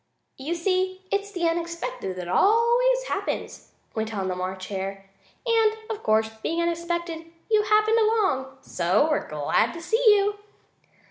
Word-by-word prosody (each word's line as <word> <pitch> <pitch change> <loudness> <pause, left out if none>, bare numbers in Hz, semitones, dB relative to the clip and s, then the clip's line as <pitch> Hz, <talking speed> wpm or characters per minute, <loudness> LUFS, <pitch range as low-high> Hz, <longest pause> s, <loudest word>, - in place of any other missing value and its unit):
"You 295 +6 -3
see, 370 +2 -1
it's 405 0 -1
the 345 -3 0
unexpected 335 - -3
that 180 -1 -6
always 475 - +3
happens," - - -4 0.2
went 220 0 -3
on 190 -2 -2
the 185 - -2
March 185 +1 -4
Hare, 195 0 -5 0.4
"and, 450 -2 +3 0.2
of 430 - -5
course, 220 0 +2
being 330 +7 -1
unexpected, 340 -1 -2 0.2
you 430 -1 +5
happened 430 +2 +3
along, 380 -13 +1
so 185 - +1
we're 300 - -1
glad 150 -1 +1
to 335 - -7
see 450 +7 +1
you." 410 -1 +5
340 Hz, 145 wpm, -25 LUFS, -, 0.4 s, you